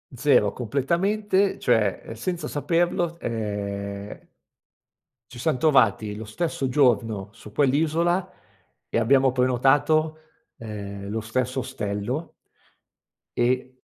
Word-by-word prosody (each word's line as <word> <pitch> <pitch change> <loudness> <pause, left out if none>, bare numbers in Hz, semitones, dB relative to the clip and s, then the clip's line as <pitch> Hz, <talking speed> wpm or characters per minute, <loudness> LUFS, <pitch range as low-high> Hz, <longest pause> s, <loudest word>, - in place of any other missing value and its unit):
0, 125 -6 +3
completamente, 190 - 0
cioè, 110 -6 +2
uhm, - - -6
senza 175 +10 -3
saperlo, 170 +2 0
ehm 100 -2 -4 1.0
ci 120 - -10
siam 155 +1 0
trovati 110 -9 +3
lo 110 - -6
stesso 135 +4 -2
giorno 115 -7 +2
su 105 -2 -13
quell'isola 160 - +1 0.6
e - - -2
abbiamo 130 +3 +4
prenotato, 145 +5 +2 0.4
ehm, 100 -4 -7
lo 110 +2 -2
stesso 125 +4 -2
ostello 125 +4 -3 1.1
e, 125 +1 +1
130 Hz, 100 wpm, -24 LUFS, 110-155 Hz, 1.1 s, abbiamo